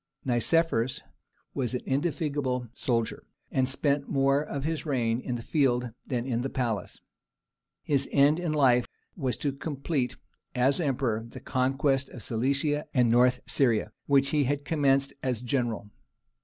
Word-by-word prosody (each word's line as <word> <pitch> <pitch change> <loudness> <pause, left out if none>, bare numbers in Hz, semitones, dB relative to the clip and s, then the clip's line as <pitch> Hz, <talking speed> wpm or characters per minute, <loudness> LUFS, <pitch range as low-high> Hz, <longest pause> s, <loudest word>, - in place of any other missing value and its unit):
Nicephorus 130 0 +1 0.5
was 130 -3 -1
an 125 - -2
indefatigable 140 -4 -1
soldier, 115 -3 -2 0.2
and 130 -1 +1
spent 140 +1 0
more 135 +1 +3
of 140 -2 -4
his 160 +1 -2
reign 120 -6 0
in 125 -1 -3
the 115 - -5
field 125 -5 +1 0.2
than 125 -3 -2
in 120 -3 -1
the 135 - -2
palace. 120 -6 -3 0.8
His 140 -2 +1
end 145 +3 +4
in 175 -3 -1
life 130 -5 +4 0.3
was 130 -7 -2
to 145 - -1
complete, 140 -2 -2 0.4
as 130 +4 +3
emperor, 125 -6 -1
the 130 - -9
conquest 135 +2 0
of 120 - -9
Cilicia 140 +5 0
and 120 -3 +4
North 125 +1 +4
Syria, 115 -5 +2 0.2
which 140 -1 +4
he 150 -2 +2
had 140 +2 -1
commenced 140 -3 +2
as 125 -3 -2
general. 120 -5 -2
135 Hz, 145 wpm, -28 LUFS, 125-140 Hz, 0.8 s, end